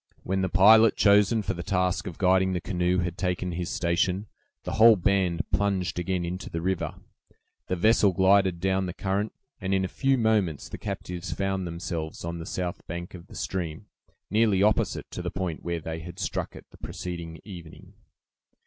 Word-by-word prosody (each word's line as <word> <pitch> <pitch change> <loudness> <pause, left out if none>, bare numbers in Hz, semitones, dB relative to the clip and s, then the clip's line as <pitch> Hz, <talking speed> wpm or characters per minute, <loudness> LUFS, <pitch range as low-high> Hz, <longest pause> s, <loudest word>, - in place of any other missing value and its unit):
When 95 +1 -1
the 95 - 0
pilot 110 +4 +6
chosen 105 +2 +4
for - - -1
the 85 - -6
task 90 +1 0
of 85 - -7
guiding 95 0 +3
the 90 - 0
canoe 90 0 0
had 90 +1 -4
taken 90 -1 -1
his 85 +1 -3
station, 90 +3 0 0.4
the - - -4
whole 115 0 +7
band 95 -3 +1
plunged 95 -3 0
again 90 0 -1
into 90 +2 -5
the 80 - -3
river, 95 +2 -2 0.7
the 90 - 0
vessel 105 +2 +4
glided 95 -1 +3
down 95 +1 0
the 90 - -6
current, 100 +2 -1 0.3
and 95 0 0
in 95 0 +1
a - - -2
few 135 +6 +1
moments 105 - +1
the - - -7
captives 90 +1 -5
found 95 -2 -2
themselves 85 -2 -5
on 85 0 -4
the 80 - -7
south 90 -3 -3
bank 85 +1 -6
of 85 -2 -11
the - - -13
stream, 85 -5 -4 0.5
nearly 105 -3 +3
opposite 105 0 +1
to - - -5
the - - -3
point 90 -4 -4
where 85 -1 -2
they 80 +1 -5
had 85 +2 -9
struck 100 - -3
it - - -11
the - - -16
preceding 85 -2 -6
evening. 85 -6 -11
95 Hz, 185 wpm, -27 LUFS, 85-100 Hz, 0.7 s, whole